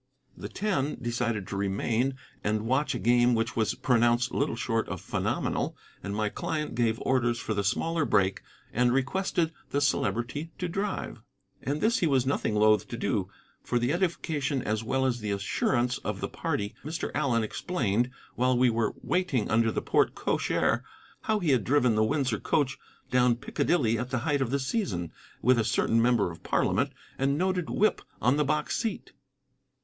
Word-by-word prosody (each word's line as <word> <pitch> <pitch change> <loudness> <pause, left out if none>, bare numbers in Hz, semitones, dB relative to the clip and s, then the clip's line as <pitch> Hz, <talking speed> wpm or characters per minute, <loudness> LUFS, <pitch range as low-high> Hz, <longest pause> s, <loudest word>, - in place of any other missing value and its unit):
The - - -7
Ten 175 -9 -1
decided 115 -4 -2
to - - -4
remain 110 +6 0 0.3
and 110 +1 0
watch 130 +5 +1
a - - 0
game 120 +1 +4
which 115 0 -1
was 110 -1 +1
pronounced 120 0 +2
little 140 - 0
short 115 -2 -1
of - - -4
phenomenal, - - -2 0.2
and 100 - -4
my 105 0 0
client 150 +7 -3
gave 115 -1 +1
orders 120 -2 +1
for 110 - -2
the 100 -1 -1
smaller 160 - 0
brake 95 -8 +2 0.3
and 120 +1 +3
requested 165 +5 0 0.2
the 140 - 0
Celebrity 130 +3 0
to 180 - -2
drive. 195 +3 -3 0.4
And 145 +3 -2
this 225 +2 +3
he 170 - +2
was 135 -4 +2
nothing 130 -5 0
loth 105 -1 +4
to - - -6
do. - - -1 0.3
For 120 - 0
the 120 +4 +1
edification 155 -7 -1
as 110 0 -1
well 130 +3 0
as 125 -2 0
the 105 -2 -4
assurance 120 +5 0
of - - -4
the - - -2
party 100 0 -3
Mr. 160 +4 -3
Allen 120 -6 +1
explained, 120 - -1 0.2
while 125 0 +2
we 125 -1 +4
were 115 -2 0
waiting 180 - 0
under 110 0 +3
the - - -2
porte - - +2
cochere, - - +1 0.4
how 220 - +2
he 175 -8 +1
had 125 -5 +3
driven 125 -2 +3
the 110 0 +3
Windsor 130 -2 0
coach 140 -4 0 0.3
down 125 -1 +4
Piccadilly 120 -2 +1
at 125 +1 -3
the 130 - -1
height 145 -3 +1
of 130 - 0
the 140 - +1
season, 130 - -2 0.3
with 125 0 +5
a - - +3
certain 115 +1 +2
member 115 -6 +3
of 85 - -12
Parliament - - +1 0.3
and 140 +1 +1
noted 185 -1 0
whip 215 - +2 0.2
on 125 +4 +3
the 150 - +3
box 150 +1 0
seat. 225 -2 -3
125 Hz, 180 wpm, -28 LUFS, 115-145 Hz, 0.4 s, with